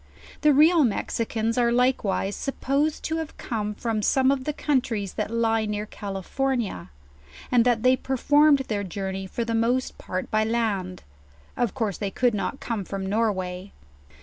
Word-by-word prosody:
The 300 - +5
real 310 +3 +6
Mexicans 230 0 -1
are 235 -1 +3
likewise 235 -5 +1
supposed 280 +2 -1
to 320 0 -1
come 210 -3 -3
from 225 -1 -2
some 265 +5 +3
of 265 -2 -1
the 300 - 0
countries 245 - -1
that - - -2
lie 225 -1 +1
near 210 0 -2
California; 205 - -3 0.6
and 245 -2 +5
that 235 -2 +2
they 255 0 +5
performed 285 +3 +3
their 205 -2 -1
journey 190 0 -4
for 235 +5 -3
the 230 - -2
most 240 +3 0
part 185 0 -4
by 215 0 +3
land; 215 -5 -1 0.5
of 240 -4 -1
course 220 -7 -2
they 200 - -1
could 245 +4 +1
not 210 +6 -3
come 225 -4 -3
from 195 +1 -5
Norway. 190 -3 -1
230 Hz, 155 wpm, -25 LUFS, 200-260 Hz, 0.6 s, real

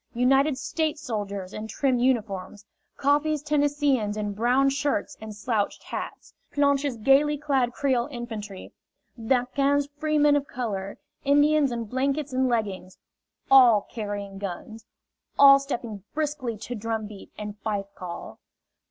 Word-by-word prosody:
United 270 +3 +3
States 310 +2 -2
soldiers 200 -8 -4
in 215 +1 -6
trim 260 +1 0
uniforms; 210 -5 -1 0.3
Coffee's 295 +1 +1
Tennesseeans 285 -7 +1
in 205 -1 -2
brown 250 +6 +3
shirts 275 -4 -1
and 215 -1 -8
slouched 210 -1 -2
hats; - - -7 0.2
Planche's 280 -2 +1
gaily 275 +6 +3
clad 275 -4 +1
Creole 250 -2 0
infantry; 220 -7 -7 0.4
D'Aquin's 270 +4 +1
freemen 295 -1 +3
of 285 0 0
color; 200 -6 -4 0.3
Indians 290 0 +4
in 235 -1 -3
blankets 275 +4 -1
and 260 0 +2
leggings 200 -6 -2 0.5
all 245 -6 +7
carrying 205 -3 -5
guns, 210 +3 -7 0.5
all 275 0 +9
stepping 235 -7 -5
briskly 290 -7 -2
to 225 +4 -6
drumbeat 215 -2 -5
and 210 0 -7
fife 200 -2 -3
call. 180 -3 -8
245 Hz, 125 wpm, -26 LUFS, 210-280 Hz, 0.5 s, all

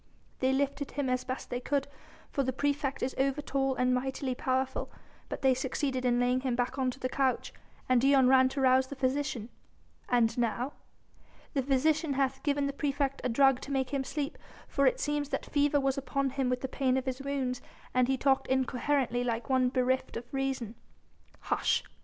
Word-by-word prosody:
"They 260 0 +2
lifted 280 +1 -1
him 275 -3 -1
as 255 0 0
best 255 0 -5
they 245 - -1
could; 280 +2 -1 0.4
for 275 - 0
the 260 -1 0
praefect 285 +1 -1
is 260 - -1
over 275 +1 +1
tall 270 -2 0
and 250 0 +2
mightily 260 +1 -1
powerful. 260 +1 -1 0.4
But - - -5
they 265 -1 +5
succeeded 260 0 -2
in 245 -1 +3
laying 250 +1 +2
him 255 -2 -1
back 250 +2 -1
on 260 -1 +2
to 255 - -7
the 255 - -1
couch, 260 0 0 0.3
and 255 -2 +4
Dion 270 -1 +5
ran 260 0 +6
to 270 +1 -3
rouse 260 0 +4
the 280 - -7
physician." 260 -3 -1 0.6
"And 235 -2 +3
now?" 240 +4 -1 0.8
"The 275 - +1
physician 285 +3 +2
hath 270 0 0
given 285 -1 +1
the 280 - -2
praefect 280 -1 -1
a 255 - 0
drug 270 +1 +4
to 280 - -7
make 265 -1 0
him 275 -2 0
sleep, 290 +2 -4 0.3
for 275 -1 +2
it - - +2
seems 295 -1 -1
that - - -2
fever 290 0 +2
was 270 0 0
upon 275 0 -1
him 265 -1 0
with 250 0 -1
the 265 - -2
pain 260 -1 +1
of 260 - -2
his 260 0 -3
wounds 265 -3 -2 0.3
and 255 -1 +3
he 265 0 +1
talked 270 0 +2
incoherently 260 -1 +1
like 235 +1 -2
one 255 -1 +3
bereft 255 -1 0
of 230 - -6
reason." 270 -5 -2 0.7
"Hush!..." - - +1
265 Hz, 195 wpm, -30 LUFS, 255-275 Hz, 0.8 s, ran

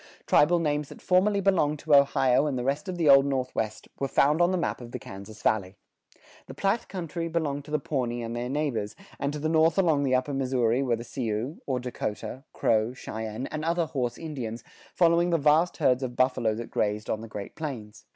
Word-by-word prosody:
Tribal 170 +4 +4
names 150 -3 -1
that - - -11
formerly 200 +2 +2
belonged 170 -6 +2
to 150 +1 -1
Ohio 140 -1 +4
and 140 -3 -1
the 125 - -2
rest 140 +8 -1
of 180 - -4
the 165 -3 +1
Old 135 -1 +8
Northwest 130 -5 -2
were 135 - 0
found 150 +4 +3
on 175 - +5
the 185 - 0
map 170 - -2
of 120 -1 -10
the - - -2
Kansas 100 +3 -11
Valley. 100 -3 +1 0.7
The - - -9
Platte 200 +4 0
country 170 -2 -4
belonged 150 -4 -2
to - - -13
the 150 - +1
Pawnee 125 -5 -2
and 115 +1 -4
their 120 +1 -3
neighbors, 135 -7 -2 0.2
and 140 - -1
to 150 - -5
the 150 +1 -2
north 160 0 +3
along 165 -7 +3
the 130 -2 +2
Upper 130 +3 -1
Missouri 130 -2 +1
were 125 -3 +1
the 115 - -7
Sioux, 120 +2 -3
or 130 -2 0
Dakota, 125 +1 -5
Crow, 110 +1 +1
Cheyenne, 110 0 -5
and 155 0 -4
other 170 +1 +1
horse 125 -6 -3
Indians, 125 -8 -5 0.3
following 170 0 +4
the 170 - +3
vast 155 +4 +3
herds 130 0 +2
of 125 -2 -4
buffalo 120 -4 +1
that 115 +1 -7
grazed 105 +1 -1
on 110 - -2
the 115 - -8
Great 100 -2 -7
Plains. 120 -9 -7
135 Hz, 210 wpm, -27 LUFS, 120-155 Hz, 0.7 s, Old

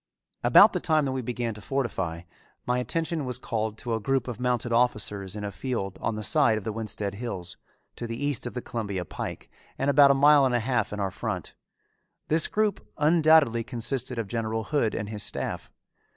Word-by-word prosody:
About - - +7
the - - 0
time 155 -2 +2
that 135 - -1
we 130 0 -2
began 120 -1 -3
to 105 - -11
fortify, 95 -10 -2 0.4
my 125 0 +1
attention 165 +4 -2
was 125 -2 -2
called 110 -1 -3
to 120 0 -4
a 110 - 0
group 130 +3 0
of 125 -2 -5
mounted 125 -1 0
officers 105 -5 0
in 105 - -5
a 100 - -3
field 105 -6 -4
on 115 - -1
the 110 - -5
side 115 -2 +3
of 110 - -5
the 110 - -3
Winsted 105 -2 -4
Hills, 100 -5 -6 0.4
to 120 - -5
the 115 0 -5
east 145 -3 -1
of 120 - -8
the 125 - -4
Columbia 100 -6 -4
Pike, - - -6 0.3
and 135 +1 +1
about 140 -1 +7
a 140 - +5
mile 145 +1 +6
and 130 -2 +2
a - - +3
half 120 -2 0
in 105 - -5
our 100 -1 -1
front. - - -4 0.8
This 160 +1 +4
group 215 -2 0
undoubtedly 155 -6 +4
consisted 125 +1 -2
of 115 -3 -2
General 110 0 -2
Hood 115 -3 0
and 105 - -3
his 105 -1 -4
staff. - - -4
120 Hz, 205 wpm, -27 LUFS, 110-135 Hz, 0.8 s, About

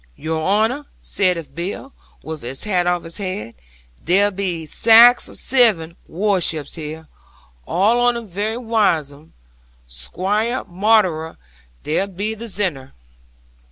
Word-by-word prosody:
'"Your 160 0 -3
honour," 220 - 0
saith 175 -8 -1
Bill, 190 - -6 0.3
with 155 -1 -7
his 125 +3 -5
hat 180 -4 0
off 175 -1 0
his 165 0 -4
head; 185 - -5 0.5
"there 200 +4 +3
be 180 -4 -3
sax 230 +8 +6
or - - -9
zeven 210 -11 +3
warships 175 -5 -1
here: 160 0 -7 0.6
arl 215 +6 +2
on 245 0 +2
'em 235 - -7
very 210 +4 -3
wise 215 - +1
'uns. 150 +3 -18 0.5
Squaire 190 - -1
Maunder 180 -4 +1 0.5
there 160 +6 -1
be 200 +3 -4
the 220 +1 -8
zinnyer." 185 -11 -3
185 Hz, 125 wpm, -19 LUFS, 160-220 Hz, 0.6 s, sax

